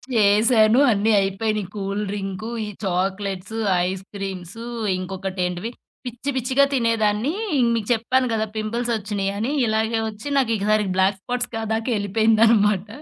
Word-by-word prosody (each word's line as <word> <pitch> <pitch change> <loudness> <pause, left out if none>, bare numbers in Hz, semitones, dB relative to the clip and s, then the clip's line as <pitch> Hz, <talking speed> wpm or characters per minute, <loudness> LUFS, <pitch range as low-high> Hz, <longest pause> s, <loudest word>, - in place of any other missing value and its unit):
చేశాను. 215 +2 +5
అన్నీ 215 +1 +2
అయిపోయినాయి, 200 0 -1
కూల్ 200 0 -3
డ్రింకు, 195 +2 -4 0.2
ఈ - - -6 0.2
చాక్లెట్సు, 195 +2 -2 0.3
ఐస్ 190 0 -4
క్రీమ్సు 195 +2 -6 0.4
ఇంకొకటి 190 0 -4
ఏంటివి 180 +6 -4 0.3
పిచ్చి 245 +3 -5
పిచ్చిగా 260 +2 +2
తినేదాన్ని 230 0 +1 0.3
ఇ - - +2 0.2
మీకు 220 -3 -3
చెప్పాను 250 +3 +2
గదా! 220 -1 0
పింపుల్సొచ్చినయని 215 -1 -2 0.2
ఇలాగే 220 +1 0
ఒచ్చి 215 +6 -9
నాకికసారి 215 -5 +2
బ్లాక్ 190 +1 +2
స్పార్ట్స్ 245 +2 -2
కా 225 - -2
దాకా 225 +3 -1
ఎళ్ళిపోయిందనమాట. 215 -1 +3
215 Hz, 125 wpm, -22 LUFS, 195-230 Hz, 0.4 s, చేశాను